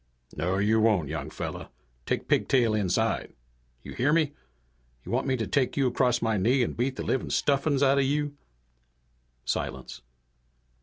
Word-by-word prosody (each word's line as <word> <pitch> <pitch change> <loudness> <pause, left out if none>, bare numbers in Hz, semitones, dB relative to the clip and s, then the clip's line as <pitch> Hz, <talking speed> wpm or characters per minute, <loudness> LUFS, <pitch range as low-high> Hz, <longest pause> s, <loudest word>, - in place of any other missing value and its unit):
"No 90 +5 -1
you 105 +3 +3
won't, 105 -9 +2
young 75 -2 -4
fella! - - -6 0.4
Take - - -1
Pigtail 120 -5 +2
inside. 110 +2 0 0.5
You - - -8
hear 130 +4 +1
me? 155 -2 +2 0.7
You - - -7
want 130 +3 0
me 130 -1 +1
to 115 - -2
take 130 +8 0
you 140 - +3
across 125 -1 +1
my 110 -2 +1
knee 120 +7 +3
and - - -3
beat 130 +2 -1
the - - -4
livin' 130 - -1
stuffings 140 0 +1
out 140 0 +4
of - - +3
you?" 145 +1 -1 1.1
Silence. 65 0 -4
120 Hz, 160 wpm, -27 LUFS, 105-135 Hz, 1.1 s, out